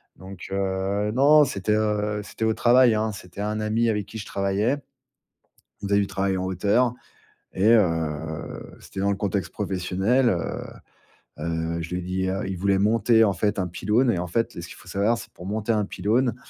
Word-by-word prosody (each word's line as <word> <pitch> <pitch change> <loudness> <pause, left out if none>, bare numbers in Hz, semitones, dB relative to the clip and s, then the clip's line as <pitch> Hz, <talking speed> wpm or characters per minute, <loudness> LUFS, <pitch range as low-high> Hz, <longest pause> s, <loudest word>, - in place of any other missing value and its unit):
Donc, 95 +1 -10
heu, 95 +2 -1
non, 145 +5 +6
non, - - +7
c'était, 105 -3 -1
heu, 105 -1 0
c'était 105 +2 -4
au 110 - +2
travail, 120 -1 +5
hein. 110 0 0
C'était 95 0 -9
un 105 +1 -2
ami 110 +2 +1
avec 105 -2 -1
qui 110 - -8
je 105 - -6
travaillais. 100 +7 0 1.0
On 100 - -5
faisait 100 0 +3
du 100 - -1
travail 95 -1 -1
en 90 - -2
hauteur 100 +6 +2 0.6
et, 100 +4 +3
heu, 80 -7 -1
c'était 95 - -9
dans 100 - +1
le - - 0
contexte 95 -3 -2
professionnel. 100 +6 0
Heu, 85 -5 -5 0.5
heu, 85 0 -2
je 85 - -6
lui 90 - -1
ai - - -5
dit, 95 +1 -2
heu 95 +2 -2
il 95 -1 -4
voulait 100 +2 +2
monter, 110 +2 +4
en 105 - +3
fait, 105 +2 -1
un 90 - 0
pylône 105 +8 +1
et, 85 - -1
en 90 - -3
fait, 115 +7 0
ce 85 - -8
qu'il - - -11
faut - - -15
savoir, 105 +5 +1
c'est - - -8
que, - - -46
pour 90 - -11
monter 105 +3 -1
un 105 -2 +1
pylône, 110 +6 0
100 Hz, 205 wpm, -24 LUFS, 95-110 Hz, 1.0 s, non